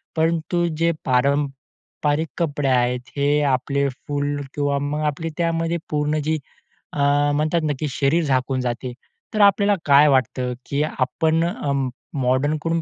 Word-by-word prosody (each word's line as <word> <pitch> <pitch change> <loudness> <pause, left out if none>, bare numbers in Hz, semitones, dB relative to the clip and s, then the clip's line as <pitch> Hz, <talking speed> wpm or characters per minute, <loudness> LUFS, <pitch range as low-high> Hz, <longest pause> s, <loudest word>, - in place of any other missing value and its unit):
परंतु 165 +2 +1
जे 170 +1 +2
पारंपरिक 140 +3 -1
कपडे 145 -4 -1
आहेत, 125 -1 +2 0.2
हे 145 +1 +2
आपले 140 +1 +1
फुल 145 +2 -3
किंवा 145 -1 0
मग 145 +2 -2
आपली 150 +3 -2
त्यामध्ये 165 0 0
पूर्ण 150 0 0
जी 155 +1 0 0.6
अ, - - -4 0.4
म्हणतात 155 +3 +1
नक्की 145 +2 -3
शरीर 140 +5 +1
झाकून 130 -2 0
जाते. 125 0 -3 0.4
तर 215 - +1
आपल्याला 200 0 +5
काय 145 +1 +6
वाटतं, 130 -2 +1
की 140 +1 -1
आपण 155 +3 0
अ, 150 -4 -2 0.5
मॉडर्नकडून 145 +6 0
145 Hz, 130 wpm, -22 LUFS, 135-160 Hz, 0.6 s, काय